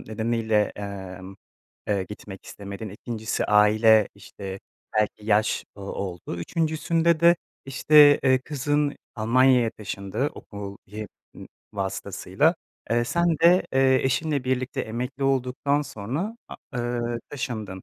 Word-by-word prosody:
nedeniyle, 110 -1 0
emm, 95 -2 -7 0.5
eee, 100 -2 +1
gitmek 100 -2 -10
istemedin, 100 +2 -7
2’ncisi 110 +2 -3
aile, 105 +1 +5
işte, 100 -1 -8 0.4
belki 105 0 0
yaş 105 0 +2
o 100 - -13
oldu, 95 -3 -5
3’üncüsünde 160 - +1
de, 170 +1 +6 0.3
işte, 145 +2 +6
eee, 130 0 +4
kızın 145 +1 -1 0.2
Almanya'ya 125 +1 +4
taşındı 105 +6 -3
okul 100 -1 -8
y 105 +2 -7 0.3
ımm, - - -10 0.3
vasıtasıyla. 95 - 0 0.4
Eee, 120 0 +2
sen 170 +7 +1
de, 175 +3 +5
eee, 130 0 +4
eşinle 140 +1 0
birlikte 130 0 -1
emekli 125 +5 -4
olduktan 135 +2 +1
sonra 145 - -4
a - - -8 0.2
ııı, 120 -1 -2
taşındın. 110 -8 -5
115 Hz, 120 wpm, -25 LUFS, 100-135 Hz, 0.5 s, de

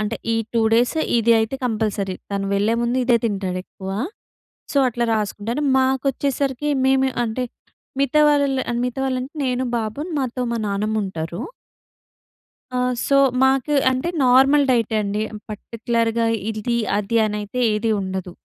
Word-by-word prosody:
అంటే 215 +2 -2 0.2
ఈ - - +2 0.2
2 230 - +2
డేస్ 240 +7 +3 0.2
ఇది 230 +1 +4
అయితే 225 +5 -1
కంపల్సరీ. 210 -4 -1 0.2
తను 195 0 -2
వెళ్ళేముందు 230 +4 +1
ఇదే 240 -2 +4
తింటాడు 190 -4 -1
ఎక్కువ. 190 0 -8 0.8
సో, 280 - +2
అట్లా 240 0 -1
రాసుకుంటాను. 215 +6 -2
మాకొచ్చేసరికి 265 +1 0 0.2
మేము 265 0 +3 0.2
అంటే, 235 +3 -2 0.6
మిగతా 280 +2 +3
వాళ్ళ 285 -1 +3 0.4
మిగతా 250 +2 -3
వాళ్ళంటే 260 +1 -2
నేను, 255 0 0
బాబు 220 +4 -4 0.2
మాతో 255 -1 -2
మా - - -1
నానమ్ముంటారు. 200 -5 -2 1.3
ఆ! - - +1 0.3
సో, 275 - +3 0.3
మాకు 270 +2 +2 0.2
అంటే 260 +6 -1 0.2
నార్మల్ 270 +3 +5
డైట్ 230 -2 +1
అండి. 210 +1 -1 0.3
పర్టిక్యులర్‌గా 230 +1 -1 0.2
ఇది 225 +2 -1 0.2
అది 220 +3 0
అనైతే 210 +4 -4
ఏది 225 +1 0
ఉండదు. 190 -2 -4
230 Hz, 130 wpm, -21 LUFS, 210-260 Hz, 1.3 s, నార్మల్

